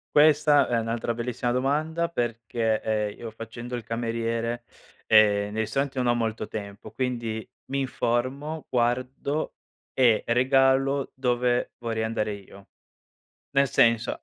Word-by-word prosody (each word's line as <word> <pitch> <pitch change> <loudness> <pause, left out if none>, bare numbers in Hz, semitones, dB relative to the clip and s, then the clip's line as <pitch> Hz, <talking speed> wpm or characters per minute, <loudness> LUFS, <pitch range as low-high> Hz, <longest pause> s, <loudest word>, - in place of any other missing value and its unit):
Questa 150 -1 +5
è 120 - 0
un'altra 115 +1 -2
bellissima 120 +1 -2
domanda 155 +6 0
perché, 115 -4 -1
ehm, 105 -1 -2
io 115 - -6
facendo 115 +2 -7
il 120 - -5
cameriere, 115 0 -2 0.4
ehm, 105 -1 +5
nei 110 - 0
ristoranti 135 +5 -2
non 125 - +1
ho 120 - +3
molto 110 -2 -2
tempo, 100 -2 -7
quindi 120 -4 -3 0.2
mi 140 +1 -2
informo, 135 +5 -2
guardo 130 +5 -1 0.4
e 120 -4 +4
regalo 135 +2 +3
dove 125 -1 0
vorrei 115 -2 -2
andare 110 -1 -1
io. 100 0 -13 0.9
Nel 140 0 +5
senso 115 0 +2
120 Hz, 125 wpm, -26 LUFS, 115-130 Hz, 0.9 s, Questa